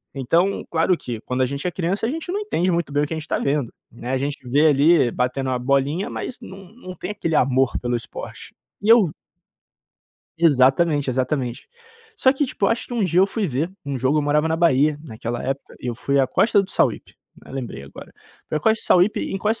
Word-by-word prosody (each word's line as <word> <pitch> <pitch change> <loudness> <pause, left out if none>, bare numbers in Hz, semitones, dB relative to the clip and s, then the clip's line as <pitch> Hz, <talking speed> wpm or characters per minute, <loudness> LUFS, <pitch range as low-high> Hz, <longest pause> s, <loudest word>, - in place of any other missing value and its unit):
Então, 165 +9 +1
claro 170 +2 +2
que 115 -6 -6
quando 125 +1 -2
a - - +4
gente 140 +6 -4
é - - -1
criança, 185 +5 -2
a - - -1
gente 325 +4 -4
não 405 - -1
entende 185 - 0
muito 170 -4 -1
bem 145 +1 +2
o - - -1
que 160 - -5
a - - -3
gente 155 +2 -7
tá - - 0
vendo, 140 -3 -1 0.2
né, 120 +2 -7
a 130 - +1
gente 140 +2 -2
vê 145 +5 +4
ali 145 -2 +4
batendo 125 +2 -1
uma 125 - -1
bolinha 140 +8 0
mas 250 - -5
não 195 0 -11
não 185 -7 -9
tem 180 - -5
aquele 165 -6 -2
amor 130 0 +2
pelo 120 0 -1
esporte. 120 - -9 0.3
E 210 - -1
eu 225 -8 +6 1.3
Exatamente, 145 -1 +3
exatamente. 130 -1 -2 0.5
Só 260 -9 +4
que 285 +1 0
tipo, 200 -5 -1
acho 230 - 0
que 245 - -7
um 230 - 0
dia 180 -1 +2
eu 195 - +5
fui 215 0 -2
ver 155 +6 -2
um 140 -1 -3
jogo, 130 +4 +1
eu - - 0
morava 150 +2 +1
na 160 - 0
Bahia, 150 -3 +3
naquela 115 -3 -5
época. 135 +1 -4
E 125 - -6
eu 120 - -2
fui 140 +3 0
à 130 - +3
Costa 210 -2 +3
do 190 - -8
Sauípe, - - 0 0.3
né, - - -13
lembrei 125 - -6
agora. 70 - -12 0.4
Foi 155 - -1
a - - -4
Costa 220 +4 +2
do - - -6
Sauípe, 185 +4 +4
em 195 - -3
Costa 215 +3 0
150 Hz, 230 wpm, -22 LUFS, 130-185 Hz, 1.3 s, eu